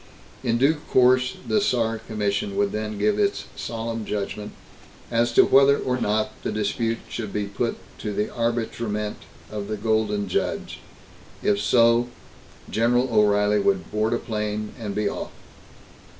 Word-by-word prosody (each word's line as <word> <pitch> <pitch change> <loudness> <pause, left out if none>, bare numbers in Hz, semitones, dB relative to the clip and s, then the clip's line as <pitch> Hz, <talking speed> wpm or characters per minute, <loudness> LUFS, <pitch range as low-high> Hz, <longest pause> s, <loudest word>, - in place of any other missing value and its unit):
In 115 0 +1
due 140 +6 +3
course, 125 0 +4
the 215 - +2
Saar 115 - +1
Commission 100 -2 -2
would 100 0 +1
then 105 0 -3
give 210 - +1
its 200 -1 +1
solemn 115 -1 -4
judgment 105 0 -4 0.6
as 120 +1 +2
to - - +7
whether 140 +1 +6
or 125 - -1
not 110 +1 +1
the - - -2
dispute 115 +2 -1
should 110 -4 -5
be 105 0 -1
put 100 +4 -2 0.2
to 105 - -3
the 105 +1 -2
arbitrament 115 -3 -2 0.3
of 105 -1 -4
the 110 - -3
Golden 105 -1 0
Judge. 90 - -2 0.6
If 100 0 +2
so, 115 +2 +4 0.6
General 120 +3 +2
O'Reilly 105 -1 +4
would 195 - 0
board 110 +2 +1
a - - +2
plane, 105 -1 -3
and 105 -3 -4
be 105 -1 +1
off. - - -4
110 Hz, 150 wpm, -24 LUFS, 105-120 Hz, 0.6 s, to